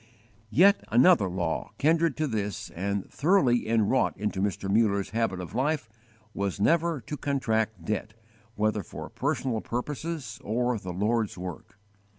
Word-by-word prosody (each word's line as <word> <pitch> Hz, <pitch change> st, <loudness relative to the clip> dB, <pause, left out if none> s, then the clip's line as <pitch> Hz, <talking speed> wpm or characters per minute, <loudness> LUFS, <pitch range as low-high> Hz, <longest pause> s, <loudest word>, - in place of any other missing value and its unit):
Yet 195 Hz, -, +5 dB
another 120 Hz, -, +5 dB
law, 90 Hz, -3 st, -2 dB
kindred 160 Hz, -1 st, +2 dB
to 155 Hz, -, +1 dB
this 105 Hz, -, -3 dB
and 100 Hz, +2 st, -2 dB
thoroughly 140 Hz, -, +3 dB
inwrought 115 Hz, +3 st, +2 dB
into 105 Hz, -2 st, -2 dB
Mr. 100 Hz, -1 st, -1 dB
Muller's 100 Hz, -2 st, +2 dB
habit 110 Hz, -4 st, 0 dB
of 90 Hz, +1 st, -7 dB
life, 140 Hz, +1 st, 0 dB, 0.5 s
was 100 Hz, -1 st, -2 dB
never 165 Hz, +6 st, +2 dB
to 130 Hz, +7 st, -6 dB
contract 110 Hz, -, -1 dB
debt, 110 Hz, +2 st, -3 dB, 0.4 s
whether 105 Hz, 0 st, +1 dB
for 85 Hz, -, -8 dB
personal 130 Hz, -5 st, -1 dB
purposes 135 Hz, -1 st, -4 dB
or 120 Hz, +2 st, 0 dB
the 95 Hz, -2 st, -6 dB
Lord's 105 Hz, +3 st, 0 dB
work. 90 Hz, +3 st, -8 dB
110 Hz, 140 wpm, -27 LUFS, 100-140 Hz, 0.5 s, Yet